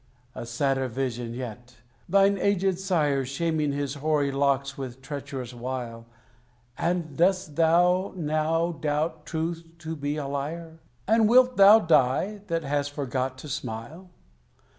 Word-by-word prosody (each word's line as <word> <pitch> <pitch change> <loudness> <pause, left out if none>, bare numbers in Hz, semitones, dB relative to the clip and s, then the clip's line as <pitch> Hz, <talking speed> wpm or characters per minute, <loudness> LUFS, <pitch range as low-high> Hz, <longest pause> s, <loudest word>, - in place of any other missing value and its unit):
A 115 - -7
sadder 135 +2 0
vision 120 -2 -3
yet: 125 0 -8 0.3
thine 195 +1 +4
aged 190 -2 +1
sire 155 -8 +1
Shaming 150 +2 -1
his 140 -1 -2
hoary 145 -1 0
locks 140 0 0
with 130 -2 -7
treacherous 135 -3 -6
wile! 120 -2 -6 0.7
And 170 -3 -2
dost 180 -2 +1
thou 175 +4 +3
now 160 +1 0
doubt 155 0 -2
Truth 165 +1 -3
to 160 0 -6
be 145 0 -3
a 145 - -3
liar? 160 +4 -5 0.3
And 220 0 +4
wilt 250 +1 +5
thou 200 +2 +9
die, 160 +5 +2
that 165 -2 -1
hast 145 0 -1
forgot 130 -2 -3
to 140 - -9
smile? 140 +6 -6
150 Hz, 135 wpm, -26 LUFS, 135-170 Hz, 0.7 s, thou